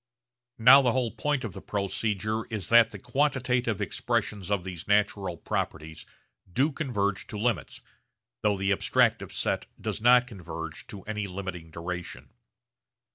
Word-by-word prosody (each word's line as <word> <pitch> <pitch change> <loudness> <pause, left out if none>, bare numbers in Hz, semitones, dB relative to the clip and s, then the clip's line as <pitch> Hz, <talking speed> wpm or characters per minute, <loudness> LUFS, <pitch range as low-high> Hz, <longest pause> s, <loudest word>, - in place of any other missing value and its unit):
Now 125 +5 +9
the 125 -3 +2
whole 125 -3 0
point 135 +5 -1
of 110 -6 -5
the - - -8
procedure 105 +2 -2
is 105 -6 -4
that 115 -1 +7
the - - -9
quantitative 125 -4 0
expressions 100 -3 -2
of 100 -3 0
these 90 -2 -7
natural 100 -3 +1
properties 80 +1 -4 0.4
do 140 - +2
converge 105 -10 -2
to 105 - -6
limits 105 - -2 0.6
though 105 -1 +2
the 95 +1 0
abstractive 100 - +2
set - - -1
does - - -3
not 125 +1 +6
converge 85 -8 -7
to 100 -3 -9
any 105 -1 -3
limiting 90 -3 -6
duration. 90 +5 -6
105 Hz, 140 wpm, -28 LUFS, 95-120 Hz, 0.6 s, Now